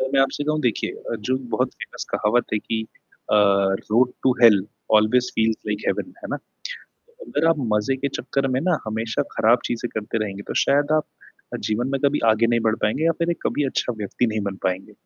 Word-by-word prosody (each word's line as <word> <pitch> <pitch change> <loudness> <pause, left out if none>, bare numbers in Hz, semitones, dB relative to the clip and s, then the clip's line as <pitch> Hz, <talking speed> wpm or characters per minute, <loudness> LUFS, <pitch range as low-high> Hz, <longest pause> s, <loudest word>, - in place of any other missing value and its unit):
अगर 130 0 -1
मैं 135 - +5
आपसे 140 +2 0
कहूँ, 155 0 0
देखिए 120 -4 0
अ, - - -6
जो 130 +5 0 0.2
बहुत - - 0
फ़ेमस - - -7
कहावत 120 +4 +2
है - - +2
कि 110 +1 -3 0.5
अ, - - +3
road 100 +4 +3
to 130 - +4
hell 105 -5 +7 0.3
always 120 +4 +4
feels 110 0 +2
like 105 0 -2
heaven, 270 - -1
है - - -6
ना? - - -1 0.5
तो 480 +1 -18
अगर 160 +3 0
आप 165 - +4 0.2
मज़े 105 +6 +1
के 140 +1 -1
चक्कर 135 +1 -2
में - - +1
ना, 175 +1 +1
हमेशा 110 +1 -1
खराब 120 +3 +4
चीज़ें 120 0 -2
करते 110 +1 -2
रहेंगे, 100 -1 -6
तो - - -3
शायद 145 +1 +2
आप 155 - +1 0.6
जीवन 120 +4 0
में 135 - 0
कभी 145 +1 +3
आगे 115 +2 +2
नहीं 115 0 +2
बढ़ 110 - +2
पाएँगे, 110 +9 +1
या 165 - +4
फिर 170 0 +1
कभी 145 - 0
अच्छा 130 -1 -1
व्यक्ति 105 +4 -1
नहीं 110 -1 -1
बन 95 - -8
पाएँगे। 95 0 -2
120 Hz, 210 wpm, -23 LUFS, 105-135 Hz, 0.6 s, hell